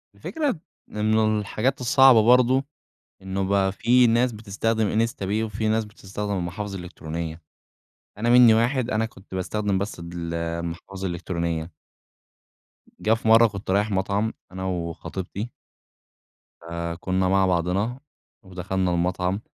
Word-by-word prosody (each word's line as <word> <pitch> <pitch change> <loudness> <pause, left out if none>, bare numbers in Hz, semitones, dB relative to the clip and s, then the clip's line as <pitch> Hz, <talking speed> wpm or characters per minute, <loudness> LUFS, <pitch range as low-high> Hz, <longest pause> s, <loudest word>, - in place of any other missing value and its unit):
الفكرة 290 - -2 0.3
إنه 110 0 +1
الحاجات 125 +6 -1
الصعبة 130 -1 +6
برضه، 125 +3 +4 0.6
إنه 95 0 -3
بقى 95 -1 +2
في 120 +5 +4
ناس 120 +2 +3
بتستخدم 110 +1 0
Instapay 105 -1 -2
وفي 110 0 -2
ناس 110 0 +1
بتستخدم 105 -1 -6
المحافظ 95 +2 -4
الإلكترونية، 85 -2 -6 0.8
أنا 115 +3 0
مني 120 -2 +8
واحد 120 +2 +1
أنا 110 -2 +1
كنت 95 -3 -11
باستخدم 100 +2 -1
بس 100 -1 -4
ال 85 -1 -6
المحافظ 85 +3 -4
الإلكترونية. 85 -2 -3 1.3
جَه 110 - +2
في 115 0 -2
مرة 115 +1 +7
كنت 100 -2 -5
رايح 105 +2 +1
مطعم 100 +3 0 0.2
أنا 95 0 -5
وخطيبتي. 95 +4 -4 1.1
فكُنا 85 +2 -2
مع 95 +1 +3
بعضنا 95 +7 0 0.4
ودخلنا 95 0 -2
المطعم، 90 +3 0
100 Hz, 120 wpm, -24 LUFS, 90-110 Hz, 1.3 s, مني